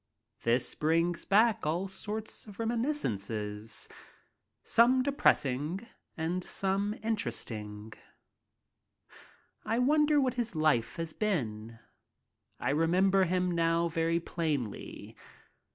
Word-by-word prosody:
This 120 +2 +1
brings 165 +2 +1
back 215 +2 +4
all 170 +6 0
sorts 215 +3 -6
of 205 - -11
reminiscences, 110 - -2 0.8
some 255 +3 +5
depressing 175 - +1 0.3
and 170 +3 -1
others 200 +3 -1
inter 220 - 0
esting. 105 -2 -6 1.7
I 225 - 0
wonder 295 +3 +4
what 260 -3 +1
his 235 -6 -3
life 155 -7 +2
has 165 -1 -4
been. 115 - -2 0.8
I - - 0
remember 185 +5 +3
him 180 +1 +1
now 170 0 +2
very 165 +1 +1
plainly. 150 -10 -4
170 Hz, 100 wpm, -31 LUFS, 135-215 Hz, 1.7 s, some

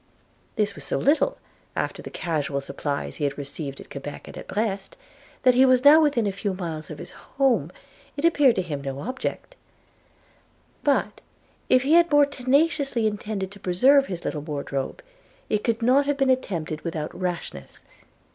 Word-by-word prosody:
This 210 -2 0
was - - -9
so - - -1
little, 320 - +2 0.4
after - - -2
the - - -8
casual 150 -4 -2
supplies 140 +1 -4
he 150 - -4
had 140 -1 -1
received 140 0 -6
at - - -13
Quebec 145 +1 -7
and - - -10
at - - -9
Brest, 210 - -3 0.5
that, 255 - +6
as - - +7
he 255 - +6
was 255 0 +4
now 305 +3 +9
within 280 -7 +2
a 200 - +1
few 200 0 -3
miles 165 -4 -5
of - - -7
his - - -9
home, 240 - 0 0.5
it 285 - -1
appeared 290 -7 +5
to 185 - 0
him 150 -5 -5
no 135 0 -5
object. 260 - -5 1.3
But 285 -1 +1 0.5
if 255 0 +5
he 285 +4 +2
had 340 0 +5
more 290 0 +6
tenaciously 280 -2 +1
intended 205 -2 -2
to 200 - -13
preserve 265 +11 +4
his 175 -2 -6
little 150 - -2
wardrobe, 145 - -4 0.5
it 210 -1 0
could 230 0 0
not 270 +4 +4
have 290 -1 +1
been 270 -1 +3
attempted 165 -11 -2
without 160 -3 -4
rashness. 175 - -5
210 Hz, 175 wpm, -25 LUFS, -, 1.3 s, now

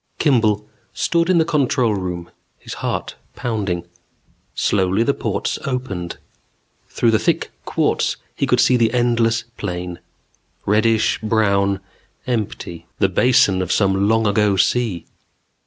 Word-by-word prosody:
Kimball 110 -8 +2 0.3
stood 170 0 +1
in 185 - +4
the 160 - +4
control 130 -7 +1
room, 90 -3 -4 0.3
his - - -9
heart - - -3 0.2
pounding. 100 -8 -2 0.7
Slowly, 95 +2 +1
the 140 - +2
ports 100 -6 -2
opened. 125 -10 -4 0.7
Through 115 - +2
the 110 - +3
thick - - 0
quartz - - 0 0.2
he - - -1
could - - +2
see 125 - +4
the 115 -2 +2
endless 115 -2 +2
plain. 90 -1 -5 0.7
Reddish 110 +2 +2
brown, 100 -3 +1 0.4
empty. 105 -8 -4
The - - +2
basin 100 -7 +3
of 90 - -2
some 100 -1 +2
long 115 0 +2
ago 105 -1 +2
sea. 110 -6 +1
110 Hz, 125 wpm, -20 LUFS, 95-120 Hz, 0.7 s, in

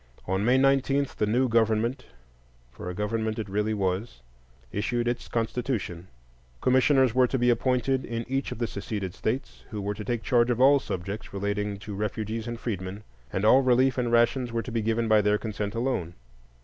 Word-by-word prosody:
On 95 +2 0
May 125 +4 +4
19 135 +1 +3
the 105 - +2
new 125 +5 +2
government—for 65 - -3
a - - -4
government 110 +2 -1
it 110 - -3
really 105 +2 -1
was—issued 90 - -4
its 120 0 -2
constitution; 115 -6 -2 0.5
commissioners 130 - +4
were 130 0 +4
to 130 - -1
be 125 0 +3
appointed 130 +2 +1
in 115 0 -4
each 135 +2 -2
of - - -5
the 120 - 0
seceded 100 -3 -4
states, 115 +5 -3
who 110 -4 -5
were 100 +1 -2
to 105 +1 -7
take 120 0 -2
charge 120 -3 +3
of 120 -1 0
"all 140 +2 +6
subjects 95 -1 -5
relating 100 +1 -2
to 100 +1 -8
refugees 110 +2 -3
and 120 -1 -5
freedmen," 100 -3 -4 0.3
and 95 - -1
all 130 +5 +7
relief 130 0 +3
and 120 -2 -1
rations 120 +1 +2
were 115 0 -1
to 125 - -7
be 115 -1 0
given 115 +1 0
by 110 -1 +5
their 105 +1 +2
consent 105 -1 -4
alone. 115 -9 -2
110 Hz, 180 wpm, -27 LUFS, 100-125 Hz, 0.5 s, all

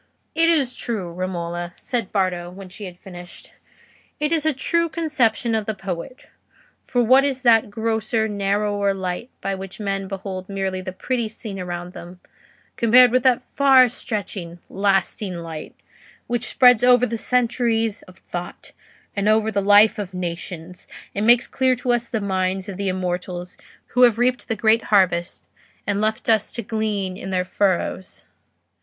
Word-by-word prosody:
"It 330 +1 +3
is 275 -7 +2
true, 200 -7 -4
Romola," 175 -1 -4
said 235 -6 -3
Bardo, 180 -3 -1
when 190 +1 -11
she 195 +3 -8
had 180 -2 -9
finished; 175 -1 -12 0.7
"it 300 +1 0
is 315 -2 +1
a - - +4
true 335 +5 0
conception 260 -9 0
of 220 -2 -1
the 220 - -2
poet; 190 +5 -6 0.6
for 245 -1 +1
what 260 +4 +6
is 270 -2 -1
that 225 -3 +5
grosser, 220 +1 -1
narrower 200 0 0
light 185 +5 -4
by 195 - -2
which 195 +1 -8
men 195 -2 -2
behold 190 -1 -6
merely 190 -1 -2
the 185 - -5
petty 235 +5 -2
scene 215 -2 -7
around 175 0 -5
them, 175 +1 -10 0.6
compared 245 +1 +6
with 255 +1 +3
that 255 -1 +3
far 270 -2 +6
stretching, 200 -7 -5
lasting 195 -1 0
light 165 -2 -7 0.5
which 240 -1 -1
spreads 250 -2 +5
over 250 0 +6
centuries 230 -2 0
of 185 0 -16
thought, 175 -1 -8 0.4
and 200 +1 +1
over 220 0 +3
the 200 -1 0
life 205 +2 +5
of 190 -2 -5
nations, 175 0 -6 0.3
and 205 +2 -1
makes 240 0 +5
clear 260 -1 +1
to 250 0 -1
us 240 0 -1
the 225 - -1
minds 190 -1 -1
of 200 - -6
the 200 -1 -1
immortals 180 -1 -4 0.3
who 250 - +1
have 240 -3 +6
reaped 250 +1 0
the 225 - -1
great 220 +1 +2
harvest 180 -4 +2 0.4
and 205 0 0
left 215 0 -1
us 220 -2 +2
to 235 - -5
glean 205 -3 -2
in 190 - -7
their 185 -1 0
furrows? 185 -1 -1
205 Hz, 160 wpm, -22 LUFS, 185-235 Hz, 0.7 s, what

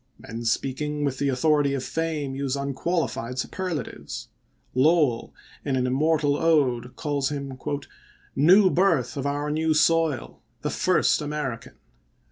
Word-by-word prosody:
Men 115 +1 -7
speak 130 +4 -1
ing 150 0 -1
with 135 -2 -2
the 140 - +1
authority 140 +1 +2
of 130 - -3
fame 155 -4 -2
use 135 0 -2
unqualified 140 -2 -2
superlatives. 135 - -4 0.4
Lowell, 140 -3 +3 0.3
in 140 -2 -1
an 125 -1 +1
immortal 145 +2 +2
ode, 130 -7 +1
calls 145 -3 -1
him 140 -3 -5 0.4
" - - -29
New 190 0 +7
birth 165 -9 +2
of 140 0 -2
our 145 +1 -1
new 160 +1 +1
soil, 160 -4 +1 0.2
the - - -1
first - - +2
Ameri 145 -5 -3
can." - - -15
145 Hz, 140 wpm, -25 LUFS, 130-155 Hz, 0.4 s, New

